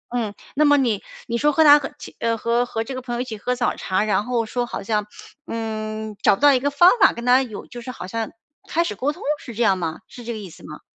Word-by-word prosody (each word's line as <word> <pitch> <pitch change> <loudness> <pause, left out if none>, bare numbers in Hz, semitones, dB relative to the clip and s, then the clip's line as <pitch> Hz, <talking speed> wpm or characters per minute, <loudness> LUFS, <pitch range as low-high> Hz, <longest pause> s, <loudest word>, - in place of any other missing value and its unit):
嗯， 220 -4 -2 0.2
那 300 - +2
么 290 -1 +5
你 235 -7 +1 0.2
你 235 0 -2
说 295 +3 +3
和 320 +2 +4
他 295 -1 +8
和 275 - -5
其 295 - -11
呃， 230 0 0
和 235 +2 +1
和 225 -1 -2
这 265 +4 -7
个 255 - -5
朋 245 -1 -4
友 240 - -2
一 - - 0
起 225 -4 -7
喝 250 +4 -1
早 245 - 0
茶， 190 +2 -1
然 210 -1 +1
后 240 -2 0
说 240 +2 -2
好 205 - -5
像， 210 0 -1 0.4
嗯， 220 -1 -4
找 - - +5
不 - - -16
到 285 - +8
一 255 - +3
个 285 +3 0
方 345 +6 +6
法 - - +7
跟 235 - -7
他 250 +1 +5
有 225 -6 -6
就 240 -1 -9
是 245 - -8
好 250 -7 -7
像 225 +3 -3 0.4
开 335 - +2
始 335 - -3
沟 270 +8 -1
通， - - -11 0.2
是 235 -4 -10
这 240 - +1
样 195 -4 +4
吗？ 165 -1 -4
是 245 - -11
这 235 - -4
个 220 - -6
意 195 -4 -8
思 - - -15
吗？ - - -10
235 Hz, 305 characters per minute, -22 LUFS, 215-255 Hz, 0.4 s, 他